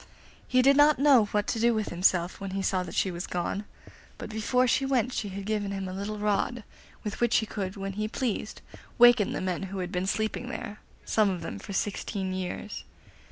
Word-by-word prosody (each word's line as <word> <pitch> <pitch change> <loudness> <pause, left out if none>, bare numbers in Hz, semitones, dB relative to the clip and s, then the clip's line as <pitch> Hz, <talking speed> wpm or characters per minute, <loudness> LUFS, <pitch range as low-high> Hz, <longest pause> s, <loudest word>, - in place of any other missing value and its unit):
He 255 0 +3
did 275 +1 +6
not 295 +1 +6
know 270 -5 +6
what 205 0 -1
to 230 - -2
do 235 0 +3
with 215 -1 -1
himself 180 +1 +1
when 195 0 -4
he 195 - -1
saw 190 -1 +1
that 180 - -7
she 190 - +1
was 175 0 -5
gone, 180 +3 -2 0.5
but - - -7
before 235 +4 +1
she 260 - +2
went 255 -2 +1
she 205 - -2
had 195 +1 -6
given 210 -1 -1
him 195 -1 -3
a 185 - -5
little 200 +3 -4
rod, 210 +3 0 0.4
with 210 +1 -5
which 240 -1 +4
he 220 - +1
could, 195 -3 -4
when 195 0 -4
he 215 +2 -2
pleased, 220 -2 -3 0.3
waken 240 -3 +6
the - - -3
men 185 -1 -2
who 195 - -5
had 180 -1 -3
been 185 0 -1
sleeping 220 +4 -1
there, 210 -3 -6 0.3
some 215 -2 +3
of 180 -3 -3
them 100 - -5
for 200 - -9
sixteen 195 -1 -2
years. 185 +3 -5
205 Hz, 215 wpm, -28 LUFS, 190-230 Hz, 0.5 s, did